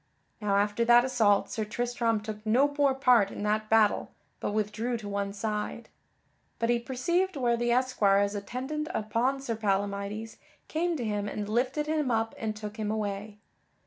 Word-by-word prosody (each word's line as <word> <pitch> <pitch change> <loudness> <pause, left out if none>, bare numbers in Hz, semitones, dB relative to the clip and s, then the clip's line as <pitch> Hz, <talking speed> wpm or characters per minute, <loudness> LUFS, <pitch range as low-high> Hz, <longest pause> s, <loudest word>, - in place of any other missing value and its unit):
Now 205 -1 +1
after 205 +3 +2
that 240 +1 +6
assault 220 -6 +2
Sir 220 - -2
Tristram 230 0 -1
took 210 0 -7
no 260 +7 +3
more 280 -2 +3
part 245 -6 +4
in - - -6
that 215 +1 0
battle 220 -2 +3 0.3
but - - -2
withdrew 215 +3 -1
to 215 -2 -8
one 200 0 -2
side. 210 +2 -4 0.7
But 230 +1 +1
he 240 - +2
perceived 340 +10 0
where 245 -4 +2
the 240 0 0
esquires 205 -5 +3
attendant 260 +9 -4
upon 235 +5 0
Sir 235 -4 -2
Palamydes 200 +1 -2 0.3
came 335 +1 -1
to 245 - -3
him 205 -1 -1
and 205 0 -4
lifted 255 +7 0
him 305 -3 0
up 225 -1 0
and 215 -1 -2
took 210 0 -7
him 215 -1 -2
away. 210 -1 -3
225 Hz, 170 wpm, -29 LUFS, 210-250 Hz, 0.7 s, that